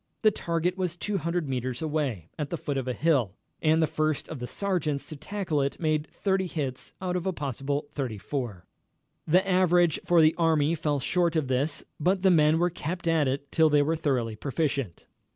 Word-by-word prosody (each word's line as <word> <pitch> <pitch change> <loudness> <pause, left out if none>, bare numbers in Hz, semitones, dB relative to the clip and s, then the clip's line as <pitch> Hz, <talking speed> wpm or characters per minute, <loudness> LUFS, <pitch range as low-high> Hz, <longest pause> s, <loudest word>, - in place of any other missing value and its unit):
The 215 - +6
target 170 +1 -1
was 180 -2 -1
200 175 -4 -2
metres 130 -1 -2
away, 145 - -2
at 145 -2 -2
the 170 - -2
foot 145 -2 -3
of 130 -2 -2
a 125 - 0
hill, 135 - +2 0.3
and 160 +1 +3
the - - +5
first 155 -1 -1
of 155 - -6
the 125 - -4
sergeants 165 -8 -1
to 155 - -6
tackle 160 -1 -2
it 140 0 -2
made 155 -2 0
30 190 -2 0
hits 135 -7 -4
out 180 -1 -1
of 180 +1 -2
a - - +2
possible 140 -2 -3
34. 120 -6 -4 0.6
The 185 +5 +4
average 175 -3 +3
for 175 -1 +4
the 155 0 +6
army 160 -2 +3
fell 150 -3 0
short 170 +4 +1
of 150 -5 0
this, 135 +4 0 0.2
but 185 +4 +1
the 190 - +6
men 155 -2 +5
were 175 +1 +2
kept 175 +1 -4
at 160 -4 +3
it 140 +2 -3
till 160 -1 +4
they 145 -1 +4
were 160 +3 +1
thoroughly 125 -8 -1
proficient. 135 - -2
155 Hz, 195 wpm, -27 LUFS, 140-175 Hz, 0.6 s, The